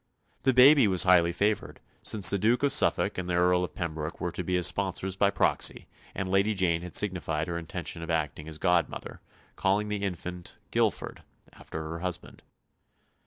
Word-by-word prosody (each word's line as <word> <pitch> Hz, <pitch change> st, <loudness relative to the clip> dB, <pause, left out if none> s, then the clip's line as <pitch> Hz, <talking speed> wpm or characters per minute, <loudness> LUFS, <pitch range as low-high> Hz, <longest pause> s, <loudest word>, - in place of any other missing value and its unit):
The 130 Hz, -, +3 dB
baby 135 Hz, -1 st, +7 dB
was 95 Hz, -2 st, +2 dB
highly 90 Hz, -2 st, +4 dB
favoured, 100 Hz, +4 st, -1 dB, 0.2 s
since 100 Hz, -4 st, +4 dB
the 100 Hz, -, 0 dB
Duke 115 Hz, +7 st, +2 dB
of 140 Hz, -, +3 dB
Suffolk 105 Hz, -8 st, +2 dB
and 90 Hz, -1 st, -5 dB
the 90 Hz, -, 0 dB
Earl 90 Hz, +1 st, +3 dB
of 90 Hz, -, -6 dB
Pembroke 80 Hz, -2 st, -5 dB
were 90 Hz, -, -3 dB
to 90 Hz, -, -4 dB
be 90 Hz, +1 st, -1 dB
his 90 Hz, -1 st, +2 dB
sponsors 95 Hz, +1 st, -1 dB
by 100 Hz, +1 st, +3 dB
proxy -, -, 0 dB, 0.3 s
and 95 Hz, -1 st, -3 dB
Lady 100 Hz, +3 st, +1 dB
Jane 85 Hz, -3 st, +1 dB
had 90 Hz, -1 st, -9 dB
signified 85 Hz, -5 st, -1 dB
her 85 Hz, -, -4 dB
intention 85 Hz, 0 st, -5 dB
of 80 Hz, -, -7 dB
acting 75 Hz, -2 st, -2 dB
as 80 Hz, -1 st, -7 dB
godmother, 90 Hz, 0 st, -1 dB, 0.3 s
calling 100 Hz, +2 st, 0 dB
the 105 Hz, -1 st, -3 dB
infant 90 Hz, -2 st, -6 dB
Guilford, -, -, -1 dB, 0.3 s
after 80 Hz, -, -8 dB
her 85 Hz, +1 st, -6 dB
husband. 90 Hz, -1 st, -5 dB
90 Hz, 180 wpm, -28 LUFS, 85-100 Hz, 0.3 s, baby